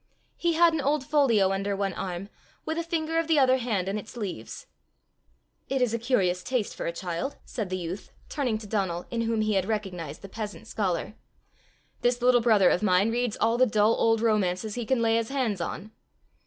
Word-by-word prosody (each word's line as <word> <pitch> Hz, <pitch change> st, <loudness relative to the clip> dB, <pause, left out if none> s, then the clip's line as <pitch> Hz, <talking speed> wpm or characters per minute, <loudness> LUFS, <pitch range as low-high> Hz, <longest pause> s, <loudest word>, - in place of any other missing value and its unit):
He 340 Hz, -1 st, 0 dB
had 335 Hz, 0 st, +5 dB
an 315 Hz, -, 0 dB
old 285 Hz, +1 st, +1 dB
folio 235 Hz, -11 st, +3 dB
under 195 Hz, +1 st, -1 dB
one 195 Hz, -1 st, -1 dB
arm, 185 Hz, +2 st, -5 dB, 0.4 s
with 320 Hz, +1 st, -2 dB
a -, -, -1 dB
finger 325 Hz, -1 st, -1 dB
of 330 Hz, -, -1 dB
the 320 Hz, -2 st, +3 dB
other 260 Hz, -2 st, +5 dB
hand 220 Hz, -7 st, -1 dB
in 200 Hz, +2 st, -1 dB
its 215 Hz, +3 st, -11 dB
leaves. 185 Hz, -, -6 dB, 1.0 s
"It 270 Hz, -, 0 dB
is 250 Hz, -3 st, +1 dB
a 230 Hz, -, 0 dB
curious 190 Hz, -7 st, +1 dB
taste 250 Hz, 0 st, -1 dB
for -, -, -4 dB
a -, -, 0 dB
child!" 175 Hz, +8 st, -4 dB
said 215 Hz, -6 st, -4 dB
the 185 Hz, -, -2 dB
youth, 180 Hz, +2 st, -6 dB, 0.2 s
turning 255 Hz, -7 st, -1 dB
to 215 Hz, -, -10 dB
Donal, 190 Hz, -5 st, -1 dB
in 235 Hz, -1 st, -1 dB
whom 225 Hz, -1 st, 0 dB
he 215 Hz, 0 st, +1 dB
had 190 Hz, -2 st, +1 dB
recognized 185 Hz, -8 st, -4 dB
the -, -, -7 dB
peasant 210 Hz, +1 st, -6 dB
scholar: 195 Hz, -3 st, -2 dB, 0.9 s
"this 245 Hz, 0 st, +2 dB
little 245 Hz, 0 st, +4 dB
brother 215 Hz, -5 st, +5 dB
of -, -, +1 dB
mine 200 Hz, +1 st, +3 dB
reads 240 Hz, -2 st, -1 dB
all 230 Hz, +2 st, +2 dB
the 255 Hz, -, +6 dB
dull 215 Hz, 0 st, +3 dB
old 225 Hz, -1 st, +2 dB
romances 210 Hz, -2 st, +1 dB
he 240 Hz, -1 st, -4 dB
can 255 Hz, -2 st, +2 dB
lay 225 Hz, 0 st, +3 dB
his 230 Hz, -1 st, -1 dB
hands 245 Hz, -9 st, -1 dB
on." 200 Hz, +5 st, -5 dB
220 Hz, 210 wpm, -27 LUFS, 195-250 Hz, 1.0 s, the